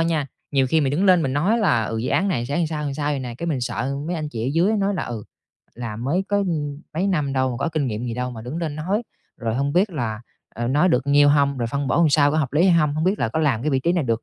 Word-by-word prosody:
nha, 165 Hz, -4 st, +1 dB, 0.2 s
nhiều 135 Hz, -2 st, +2 dB
khi 160 Hz, +5 st, +2 dB
mình 135 Hz, -3 st, +1 dB
đứng 180 Hz, +7 st, +1 dB
lên 185 Hz, -3 st, +5 dB
mình 135 Hz, -, -1 dB
nói 180 Hz, -, +2 dB
là, 150 Hz, -, +2 dB
ừ, 115 Hz, -, -3 dB
dự 115 Hz, -, -2 dB
án 195 Hz, -, +2 dB
này 120 Hz, -10 st, -1 dB
sẽ 150 Hz, +6 st, 0 dB
sao 150 Hz, -3 st, -3 dB
sao 145 Hz, +1 st, -2 dB
vậy 145 Hz, -, -1 dB
nè, 120 Hz, -2 st, -6 dB
cái 170 Hz, -, -4 dB
mình 150 Hz, -6 st, -1 dB
sợ 125 Hz, +2 st, -2 dB
mấy 175 Hz, -, -2 dB
anh 155 Hz, -2 st, -3 dB
chị 115 Hz, -2 st, -4 dB
ở -, -, -1 dB
dưới 175 Hz, +6 st, +3 dB
nói 200 Hz, 0 st, 0 dB
là, 175 Hz, -, -2 dB
ừ, 115 Hz, -3 st, -5 dB, 0.5 s
"Làm 115 Hz, -1 st, -6 dB
mới 175 Hz, +8 st, 0 dB
có, 205 Hz, -, +1 dB
ưm, 155 Hz, -7 st, -2 dB
mấy 180 Hz, +5 st, 0 dB
năm 150 Hz, -8 st, 0 dB
đâu 130 Hz, -1 st, +1 dB
mà 120 Hz, -, -4 dB
có 140 Hz, -, -1 dB
kinh 155 Hz, -4 st, -1 dB
nghiệm 110 Hz, -1 st, -3 dB
gì 115 Hz, -, -3 dB
đâu 125 Hz, +1 st, -3 dB
mà 115 Hz, -2 st, -8 dB
đứng 125 Hz, +7 st, -6 dB
lên 160 Hz, -4 st, -3 dB
nói", 190 Hz, +9 st, -1 dB, 0.3 s
rồi: 115 Hz, -2 st, -2 dB
"Hông 140 Hz, +3 st, 0 dB
biết 185 Hz, +5 st, +2 dB
là, 115 Hz, -9 st, -3 dB, 0.3 s
ờ, 120 Hz, +1 st, -2 dB
nói 150 Hz, +7 st, +3 dB
được 130 Hz, -3 st, +1 dB
nhiêu 145 Hz, 0 st, +5 dB
hông? 140 Hz, -2 st, +3 dB
Rồi 120 Hz, -, -1 dB
phân 140 Hz, +3 st, -2 dB
bổ 120 Hz, -, +1 dB
làm 170 Hz, -2 st, +4 dB
sao? 145 Hz, 0 st, +4 dB
Có 155 Hz, -, 0 dB
hợp 140 Hz, -4 st, -1 dB
lý 155 Hz, +4 st, +3 dB
hay -, -, +5 dB
hông? 150 Hz, -1 st, +1 dB
Hông 155 Hz, +1 st, -1 dB
biết 190 Hz, +3 st, +1 dB
là -, -, 0 dB
có 115 Hz, -, -2 dB
làm 135 Hz, -7 st, +1 dB
cái 155 Hz, -, 0 dB
vị 135 Hz, -2 st, +1 dB
trí 170 Hz, -, +1 dB
này 175 Hz, -4 st, 0 dB
được 115 Hz, -1 st, -1 dB
145 Hz, 315 wpm, -22 LUFS, 125-165 Hz, 0.5 s, lên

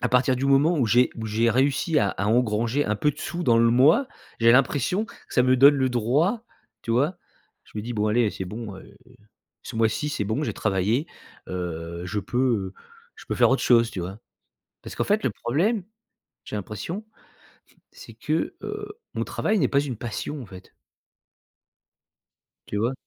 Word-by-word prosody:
à 125 Hz, -, +1 dB
partir 125 Hz, +1 st, +3 dB
du 130 Hz, -, -2 dB
moment 145 Hz, +5 st, +4 dB
où 125 Hz, -, +3 dB
j'ai 120 Hz, +3 st, +4 dB
où 115 Hz, -, -5 dB
j'ai 110 Hz, +2 st, +1 dB
réussi 140 Hz, +6 st, +2 dB
à 100 Hz, -, +2 dB
à 100 Hz, -, -3 dB
engranger 115 Hz, +4 st, +1 dB
un 105 Hz, -, 0 dB
peu 150 Hz, -, +2 dB
de -, -, -13 dB
sous 175 Hz, +3 st, -4 dB
dans 120 Hz, -8 st, +4 dB
le 115 Hz, 0 st, +4 dB
mois, 145 Hz, -, +5 dB, 0.3 s
j'ai 115 Hz, 0 st, +6 dB
l'impression 145 Hz, -, +2 dB
que -, -, -15 dB, 0.2 s
ça 125 Hz, -, +5 dB
me 130 Hz, +1 st, +3 dB
donne 140 Hz, +3 st, +7 dB
le 130 Hz, -1 st, +1 dB
droit, 145 Hz, -, +1 dB, 0.4 s
tu 115 Hz, -, -5 dB
vois? 145 Hz, +9 st, +1 dB, 0.5 s
Je -, -, -21 dB
me -, -, -3 dB
dis: 120 Hz, +3 st, -5 dB
«Bon 105 Hz, 0 st, 0 dB
allez, 110 Hz, 0 st, +2 dB
c'est 95 Hz, -, -6 dB
bon, 105 Hz, 0 st, -7 dB
heu, 95 Hz, -, -12 dB, 0.8 s
ce -, -, -9 dB
mois-ci, 115 Hz, +6 st, +1 dB
c'est 105 Hz, -8 st, -2 dB
bon 110 Hz, +8 st, -1 dB
j'ai -, -, -2 dB
travaillé, 110 Hz, -, 0 dB, 0.4 s
heu, 85 Hz, -1 st, -5 dB
je 105 Hz, +3 st, -3 dB
peux, 120 Hz, +5 st, -4 dB
heu, 110 Hz, -8 st, 0 dB, 0.4 s
je -, -, -13 dB
peux -, -, -2 dB
faire -, -, +5 dB
autre 135 Hz, -, +1 dB
chose», 115 Hz, -1 st, +4 dB
tu 95 Hz, -, -5 dB
vois? 95 Hz, +5 st, -6 dB, 0.6 s
Parce -, -, -8 dB
qu'en -, -, 0 dB
fait 210 Hz, +1 st, +1 dB
le -, -, +2 dB
problème, 175 Hz, -, -1 dB, 0.6 s
j'ai -, -, -6 dB
l'impression 110 Hz, -, -6 dB, 0.9 s
c'est -, -, -12 dB
que, -, -, -2 dB
heu, 415 Hz, +2 st, -6 dB, 0.2 s
mon -, -, -1 dB
travail 215 Hz, 0 st, -1 dB
n'est 135 Hz, -8 st, +2 dB
pas 140 Hz, -, +2 dB
une 135 Hz, -5 st, -4 dB
passion, 120 Hz, +5 st, -5 dB
en 120 Hz, -, -10 dB
fait. 95 Hz, -1 st, -14 dB, 1.9 s
Tu 105 Hz, -, -3 dB
vois? 115 Hz, +5 st, 0 dB
120 Hz, 190 wpm, -24 LUFS, 105-140 Hz, 1.9 s, donne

